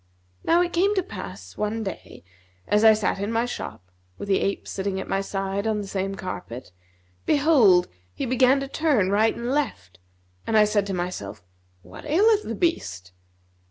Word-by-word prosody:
Now 345 Hz, +2 st, +4 dB
it 350 Hz, -, -4 dB
came 395 Hz, +4 st, +2 dB
to 380 Hz, -, +1 dB
pass 95 Hz, -, -9 dB
one 215 Hz, +1 st, -2 dB
day, 190 Hz, -, -8 dB, 0.4 s
as 210 Hz, +1 st, +2 dB
I 220 Hz, -1 st, +8 dB
sat 210 Hz, -2 st, -1 dB
in 200 Hz, +2 st, -2 dB
my 230 Hz, +1 st, +1 dB
shop, 95 Hz, -, -7 dB, 0.3 s
with 205 Hz, -, -7 dB
the 195 Hz, -, +3 dB
ape 200 Hz, -, -2 dB
sitting 190 Hz, -1 st, -3 dB
at -, -, -6 dB
my 195 Hz, -, 0 dB
side 195 Hz, +1 st, -3 dB
on 215 Hz, -1 st, 0 dB
the 205 Hz, -, -4 dB
same 195 Hz, 0 st, -3 dB
carpet, 125 Hz, -, -7 dB, 0.6 s
behold, 265 Hz, -, +5 dB, 0.2 s
he -, -, -4 dB
began 255 Hz, +2 st, +3 dB
to 275 Hz, -, -4 dB
turn 275 Hz, -, +1 dB
right 215 Hz, +2 st, +3 dB
and 240 Hz, +1 st, -3 dB
left, 90 Hz, -, -3 dB, 0.5 s
and 220 Hz, -, +2 dB
I 210 Hz, -, +6 dB
said 205 Hz, -1 st, 0 dB
to 195 Hz, -, -2 dB
myself, 110 Hz, -, -5 dB, 0.4 s
'What 90 Hz, +3 st, -12 dB
aileth 420 Hz, +7 st, +4 dB
the -, -, -5 dB
beast?' 95 Hz, -, -2 dB
205 Hz, 180 wpm, -24 LUFS, 185-265 Hz, 0.6 s, I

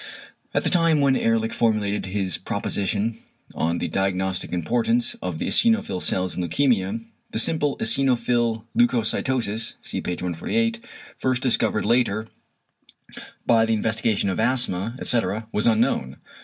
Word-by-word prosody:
At -, -, 0 dB
the -, -, 0 dB
time 165 Hz, -4 st, +3 dB
when 140 Hz, -2 st, +3 dB
Ehrlich 115 Hz, -2 st, +1 dB
formulated 105 Hz, -3 st, 0 dB
his 95 Hz, -2 st, -2 dB
proposition 105 Hz, +3 st, -2 dB, 0.3 s
on 85 Hz, +1 st, -1 dB
the -, -, -2 dB
diagnostic 95 Hz, -1 st, -1 dB
importance 115 Hz, +7 st, 0 dB
of 90 Hz, -3 st, -3 dB
the -, -, -3 dB
eosinophil 225 Hz, -, +2 dB
cells 95 Hz, -1 st, -1 dB
in -, -, -2 dB
leukæmia, 110 Hz, -, 0 dB, 0.2 s
the -, -, -4 dB
simple 145 Hz, +4 st, +2 dB
eosinophil 120 Hz, -4 st, +1 dB
leucocytosis 115 Hz, -1 st, +1 dB
(see -, -, -4 dB
p. 90 Hz, -, -3 dB
148), 225 Hz, -, -2 dB, 0.4 s
first 130 Hz, -1 st, 0 dB
discovered 115 Hz, -4 st, +1 dB
later 115 Hz, -3 st, +1 dB, 1.2 s
by 115 Hz, -1 st, +4 dB
the 115 Hz, 0 st, +1 dB
investigation 110 Hz, -2 st, 0 dB
of 95 Hz, -, -2 dB
asthma 115 Hz, -3 st, 0 dB
etc., 110 Hz, -2 st, +1 dB
was 105 Hz, -, +2 dB
unknown. 110 Hz, -, +1 dB
115 Hz, 130 wpm, -23 LUFS, 95-125 Hz, 1.2 s, by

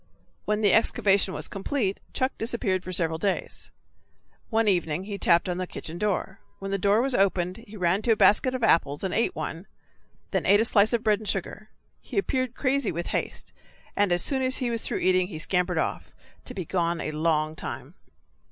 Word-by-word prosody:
When 210 Hz, 0 st, 0 dB
the 205 Hz, -3 st, +4 dB
excavation 200 Hz, -3 st, +2 dB
was -, -, -3 dB
complete 200 Hz, 0 st, -2 dB
Chuck 260 Hz, +1 st, 0 dB
disappeared 210 Hz, -5 st, -1 dB
for 185 Hz, -, -6 dB
several 165 Hz, -3 st, 0 dB
days. 195 Hz, +2 st, -2 dB, 0.8 s
One 225 Hz, -1 st, +1 dB
evening 175 Hz, -3 st, +1 dB
he 200 Hz, 0 st, -6 dB
tapped 170 Hz, 0 st, +3 dB
on 180 Hz, 0 st, -2 dB
the 185 Hz, -, -3 dB
kitchen 170 Hz, 0 st, -7 dB
door. 195 Hz, -2 st, -1 dB, 0.2 s
When 195 Hz, 0 st, -6 dB
the 195 Hz, -, 0 dB
door 205 Hz, +5 st, +3 dB
was 270 Hz, 0 st, 0 dB
opened 185 Hz, -4 st, +1 dB
he 210 Hz, +1 st, -10 dB
ran 180 Hz, +2 st, +2 dB
to 230 Hz, -, +1 dB
a -, -, -1 dB
basket 255 Hz, +5 st, +4 dB
of 250 Hz, -, -4 dB
apples 145 Hz, -8 st, +2 dB
and 190 Hz, -, -2 dB
ate 230 Hz, -, +1 dB
one, 160 Hz, +4 st, -5 dB, 0.6 s
then -, -, -1 dB
ate 205 Hz, +1 st, +6 dB
a 225 Hz, -, +3 dB
slice 215 Hz, 0 st, +4 dB
of 235 Hz, -1 st, +1 dB
bread 210 Hz, -2 st, +3 dB
and 215 Hz, -, -6 dB
sugar. 205 Hz, +3 st, -4 dB, 0.3 s
He -, -, -8 dB
appeared 255 Hz, -10 st, 0 dB
crazy 275 Hz, -3 st, 0 dB
with 170 Hz, +1 st, -4 dB
haste, -, -, -3 dB, 0.4 s
and 205 Hz, -2 st, +2 dB
as 175 Hz, -1 st, +3 dB
soon 270 Hz, -2 st, +1 dB
as 260 Hz, 0 st, +2 dB
he 245 Hz, -2 st, -1 dB
was 230 Hz, -1 st, -1 dB
through -, -, -2 dB
eating 185 Hz, -1 st, +2 dB
he 175 Hz, -5 st, -7 dB
scampered 180 Hz, +2 st, 0 dB
off, -, -, -2 dB, 0.4 s
to -, -, -9 dB
be 185 Hz, -, -4 dB
gone 170 Hz, -1 st, -1 dB
a 155 Hz, -, -3 dB
long 155 Hz, 0 st, 0 dB
time. -, -, -7 dB
195 Hz, 205 wpm, -26 LUFS, 175-220 Hz, 0.8 s, ate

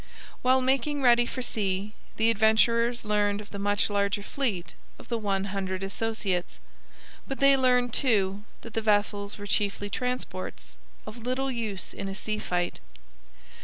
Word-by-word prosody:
While 260 Hz, +1 st, +4 dB
making 270 Hz, +2 st, +1 dB
ready 240 Hz, -1 st, +5 dB
for 255 Hz, -, -4 dB
sea 200 Hz, -2 st, -2 dB, 0.2 s
the 225 Hz, +1 st, +4 dB
Adventurers 230 Hz, +2 st, +3 dB
learned 205 Hz, -1 st, +1 dB
of 210 Hz, -, -10 dB
the 200 Hz, -, -6 dB
much 205 Hz, +1 st, +2 dB
larger 200 Hz, 0 st, 0 dB
fleet 205 Hz, -9 st, -2 dB, 0.2 s
of -, -, -14 dB
the 235 Hz, -, 0 dB
One 195 Hz, -2 st, 0 dB
Hundred 190 Hz, -1 st, -2 dB
Associates; 195 Hz, -3 st, -2 dB, 0.7 s
but 270 Hz, -, -4 dB
they 275 Hz, 0 st, +6 dB
learned, 250 Hz, -2 st, +3 dB
too, 205 Hz, -6 st, +1 dB, 0.2 s
that 230 Hz, -, -10 dB
the 225 Hz, -, 0 dB
vessels 205 Hz, -1 st, +1 dB
were 205 Hz, -, -7 dB
chiefly 205 Hz, 0 st, -1 dB
transports, 250 Hz, -7 st, -4 dB, 0.3 s
of 215 Hz, +2 st, -8 dB
little 255 Hz, +3 st, -1 dB
use 220 Hz, -6 st, -3 dB
in 195 Hz, -, -5 dB
a 195 Hz, -, -5 dB
sea 215 Hz, +1 st, -2 dB
fight. 175 Hz, -3 st, -2 dB
215 Hz, 155 wpm, -27 LUFS, 200-245 Hz, 0.7 s, they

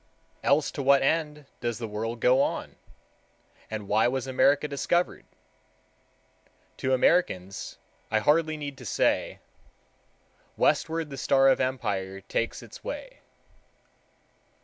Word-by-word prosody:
Else 145 Hz, +1 st, +2 dB
to 145 Hz, -, -4 dB
what 140 Hz, 0 st, +4 dB
end 150 Hz, 0 st, 0 dB
does 120 Hz, -2 st, -2 dB
the 115 Hz, -, -5 dB
world 115 Hz, +2 st, -4 dB
go 130 Hz, +2 st, +5 dB
on, -, -, -2 dB, 0.9 s
and 110 Hz, -2 st, -5 dB
why 110 Hz, +3 st, +3 dB
was 130 Hz, +1 st, -1 dB
America 140 Hz, +3 st, +3 dB
discovered? 150 Hz, +5 st, -1 dB, 1.5 s
To 130 Hz, 0 st, +1 dB
Americans 110 Hz, -, 0 dB, 0.3 s
I 110 Hz, -, +2 dB
hardly 155 Hz, +7 st, +2 dB
need 145 Hz, -2 st, -6 dB
to -, -, -10 dB
say— -, -, 0 dB, 1.2 s
"Westward 160 Hz, -2 st, +1 dB
the 135 Hz, -, -6 dB
star 135 Hz, +1 st, +4 dB
of -, -, +3 dB
empire 100 Hz, -7 st, -2 dB
takes 115 Hz, +4 st, -3 dB
its -, -, -13 dB
way." -, -, -7 dB
135 Hz, 120 wpm, -27 LUFS, 115-150 Hz, 1.5 s, go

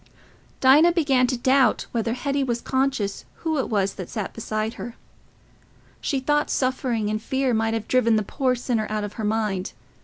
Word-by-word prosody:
Dinah 300 Hz, +6 st, +6 dB
began 275 Hz, -7 st, +3 dB
to 255 Hz, 0 st, -1 dB
doubt 260 Hz, +2 st, +3 dB
whether 230 Hz, -1 st, -1 dB
Hetty 275 Hz, +2 st, -1 dB
was 240 Hz, -2 st, -1 dB
conscious 260 Hz, -6 st, -1 dB, 0.2 s
who 315 Hz, -2 st, +1 dB
it -, -, -2 dB
was 200 Hz, -3 st, +1 dB
that 185 Hz, -3 st, -7 dB
sat 210 Hz, -4 st, -4 dB
beside 215 Hz, 0 st, -3 dB
her. 240 Hz, -1 st, -8 dB, 1.1 s
She 275 Hz, -, -1 dB
thought 295 Hz, +3 st, +1 dB
suffering 255 Hz, -4 st, 0 dB
and 215 Hz, 0 st, -2 dB
fear 265 Hz, +1 st, 0 dB
might 225 Hz, 0 st, +1 dB
have 225 Hz, -, -4 dB
driven 240 Hz, -3 st, +3 dB
the 215 Hz, -, +1 dB
poor 255 Hz, +4 st, 0 dB
sinner 235 Hz, -3 st, -1 dB
out 215 Hz, -1 st, -2 dB
of 205 Hz, 0 st, -5 dB
her -, -, -4 dB
mind. 210 Hz, -3 st, -1 dB
240 Hz, 180 wpm, -24 LUFS, 215-265 Hz, 1.1 s, Dinah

